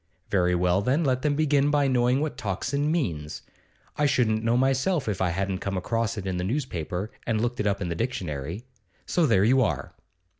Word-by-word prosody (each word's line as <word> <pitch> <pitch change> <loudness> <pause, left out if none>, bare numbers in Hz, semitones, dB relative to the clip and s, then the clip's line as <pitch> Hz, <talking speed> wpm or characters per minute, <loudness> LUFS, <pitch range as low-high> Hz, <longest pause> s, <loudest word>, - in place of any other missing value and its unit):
Very 90 -2 +2
well, 90 +2 +2
then 135 +10 +1
let 130 -3 +1
them 145 0 +1
begin 145 -2 +2
by 145 -1 +2
knowing 125 +1 +2
what 155 -1 -2
Tocsin 140 - -1
means. 80 - -2 0.5
I 150 - +3
shouldn't 115 -6 +1
know 115 +1 +2
myself 135 +4 +1
if 100 -4 -2
I 95 - +2
hadn't 95 +2 -2
come 100 -1 -3
across 115 +4 -1
it 100 - -5
in 95 -1 -2
the 90 - -2
newspaper 95 - -3 0.2
and 115 -2 +1
looked 120 +2 -1
it 105 - +1
up 100 0 0
in 90 - -2
the - - -1
dictionary; 85 - -3 0.4
so 170 -3 +2
there 100 -6 +4
you 130 +5 +4
are! 80 - -1
115 Hz, 200 wpm, -26 LUFS, 95-135 Hz, 0.5 s, there